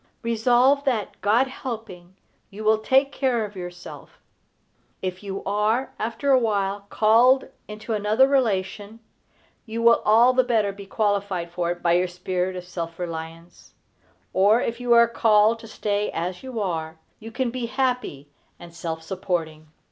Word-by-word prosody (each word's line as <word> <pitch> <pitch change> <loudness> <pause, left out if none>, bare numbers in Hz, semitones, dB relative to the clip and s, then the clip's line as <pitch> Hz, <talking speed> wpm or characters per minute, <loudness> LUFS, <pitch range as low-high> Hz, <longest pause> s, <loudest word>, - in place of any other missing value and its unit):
Resolve 245 +5 +3
that, 230 -7 -2
God 225 +6 +3
helping, 225 -9 -8 0.3
you 210 +2 -9
will 215 0 +3
take 270 +5 +2
care 255 -5 0
of 210 0 -11
yourself. 175 -1 -10 0.9
If 185 -1 -4
you 195 -1 -6
are, 210 +6 0
after 230 +6 -1
a 260 - +6
while, 200 -3 -1
called 240 +5 +4 0.2
into 215 +2 -6
another 215 +5 +3
relation, 215 -4 -1 0.7
you 230 +1 -4
will 230 0 +5
all 230 +4 +5
the 255 0 +3
better 220 -5 +1
be 200 0 -11
qualified 200 -5 -1
for 175 -1 -2
it 175 0 -4
by 170 - +3
your 180 +1 +2
spirit 180 +1 -3
of 180 - -6
self 170 -2 -6
reliance; 165 0 -8 0.6
or 205 +5 +4
if 235 -1 -3
you 245 -1 -2
are 235 0 +6
called 225 -1 +3
to 225 - -11
stay 210 -1 -2
as 180 +2 -4
you 260 -3 -6
are, 160 -5 -3 0.2
you 225 +1 -10
can 245 0 -2
be 245 -1 -4
happy 250 - -2 0.3
and 170 -1 -13
self 165 -1 -5
supporting. 160 -3 -4
210 Hz, 155 wpm, -24 LUFS, 180-235 Hz, 0.9 s, a